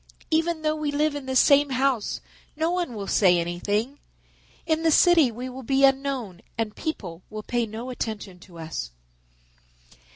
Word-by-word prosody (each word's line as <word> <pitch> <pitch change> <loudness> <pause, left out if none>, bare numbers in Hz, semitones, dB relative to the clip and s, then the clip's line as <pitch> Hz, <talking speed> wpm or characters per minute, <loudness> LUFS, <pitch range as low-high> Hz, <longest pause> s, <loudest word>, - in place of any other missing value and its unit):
Even 325 0 +1
though 310 0 +1
we 305 -1 -2
live 300 +1 +1
in 285 -2 -6
the 260 - -2
same 285 +2 +5
house 260 -3 0 0.3
no 320 +3 0
one 350 -9 -2
will 200 -2 -5
say 185 -3 +4
anything. 205 +10 -2 0.7
In 320 -1 +1
the 325 - +3
city 325 -3 +6
we 245 +3 -6
will 260 +1 -8
be 270 +2 +3
unknown 270 -9 0 0.2
and 225 -2 -2
people 190 - -5
will 215 0 -7
pay 240 0 -1
no 230 +4 -6
attention 210 -6 -5
to 175 -1 -15
us." 160 - -5
255 Hz, 165 wpm, -25 LUFS, 210-295 Hz, 0.7 s, city